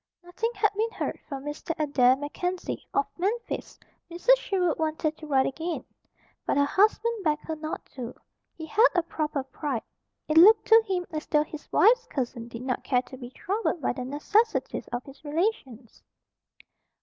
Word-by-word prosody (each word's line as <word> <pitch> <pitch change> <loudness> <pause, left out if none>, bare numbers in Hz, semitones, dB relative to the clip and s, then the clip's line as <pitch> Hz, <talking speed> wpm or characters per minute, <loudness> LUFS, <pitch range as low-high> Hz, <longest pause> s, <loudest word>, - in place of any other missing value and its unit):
Nothing 355 +6 -2
had 410 0 +2
been 440 +2 0
heard - - -4
from 275 -2 -5
Mr. 295 +2 -4
Adair 265 -4 +4
MacKenzie, 355 +6 -4
of 280 - +2
Memphis. 445 +6 -3 0.3
Mrs. 350 +9 +4
Sherwood 365 -9 0
wanted 315 0 -1
to 310 - -10
write 270 -2 +3
again; 325 +5 -3 0.6
but - - 0
her 285 - +4
husband 430 +6 +2
begged 300 -2 0
her 320 - -4
not 310 0 -6
to. 250 -2 -6 0.4
He 320 - -6
had 435 +10 +5
a 350 - +3
proper 305 -4 -2
pride. 270 -2 -4 0.4
It 310 +1 +5
looked 430 +6 +8
to 450 0 +8
him 365 -2 -1
as 310 -1 -5
though 300 -1 +3
his 305 0 -11
wife's - - +5
cousin 240 -3 -4
did 235 0 -8
not 255 -1 -2
care 250 -2 +1
to 260 - -11
be 245 -2 -8
troubled 385 - -2
by 270 - 0
the 255 0 -5
necessities 405 - 0
of 245 +1 -4
his 275 +2 -14
relations. 290 - -3
310 Hz, 175 wpm, -27 LUFS, 275-375 Hz, 0.6 s, looked